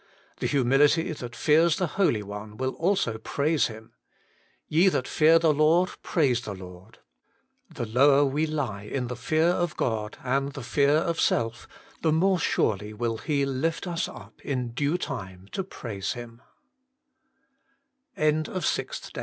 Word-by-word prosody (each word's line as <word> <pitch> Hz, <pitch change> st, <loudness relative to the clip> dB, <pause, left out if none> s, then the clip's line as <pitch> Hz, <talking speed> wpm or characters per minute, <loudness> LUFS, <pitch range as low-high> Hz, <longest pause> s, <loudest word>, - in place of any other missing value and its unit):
The -, -, -1 dB
humility 145 Hz, +6 st, +3 dB
that 120 Hz, -5 st, -7 dB
fears 160 Hz, +2 st, +4 dB
the 185 Hz, -, +1 dB
Holy 155 Hz, -, +1 dB
One 105 Hz, +1 st, -8 dB
will 130 Hz, 0 st, -1 dB
also 165 Hz, -, 0 dB
praise 145 Hz, +6 st, +1 dB
Him: 110 Hz, -1 st, -11 dB, 0.4 s
' -, -, -37 dB, 0.3 s
Ye 165 Hz, +5 st, +4 dB
that 130 Hz, -8 st, -1 dB
fear 160 Hz, +1 st, +5 dB
the 160 Hz, -2 st, +3 dB
Lord: 160 Hz, +5 st, +3 dB
praise 130 Hz, -8 st, +1 dB
the 105 Hz, -4 st, -6 dB
Lord.' 95 Hz, +3 st, -12 dB, 0.7 s
The 145 Hz, -7 st, -4 dB
lower 140 Hz, +5 st, +4 dB
we 150 Hz, +4 st, 0 dB
lie 135 Hz, -10 st, -3 dB
In 120 Hz, +4 st, -4 dB
the 125 Hz, -, -4 dB
fear 155 Hz, +7 st, +1 dB
of 175 Hz, -2 st, -1 dB
God, 110 Hz, -3 st, -2 dB
and 135 Hz, +2 st, 0 dB
the 135 Hz, -3 st, -7 dB
fear 140 Hz, +4 st, +2 dB
of 165 Hz, +1 st, 0 dB
self, 115 Hz, 0 st, 0 dB, 0.3 s
the 160 Hz, -, +2 dB
more 180 Hz, +4 st, +3 dB
surely 105 Hz, -7 st, 0 dB
will 115 Hz, 0 st, -2 dB
He 145 Hz, -3 st, 0 dB
l\ft 140 Hz, +7 st, -1 dB
us 170 Hz, -2 st, -2 dB
up -, -, -13 dB
in 125 Hz, -4 st, -2 dB
due 145 Hz, +7 st, 0 dB
time 95 Hz, -, -6 dB
140 Hz, 140 wpm, -26 LUFS, 115-160 Hz, 0.7 s, fear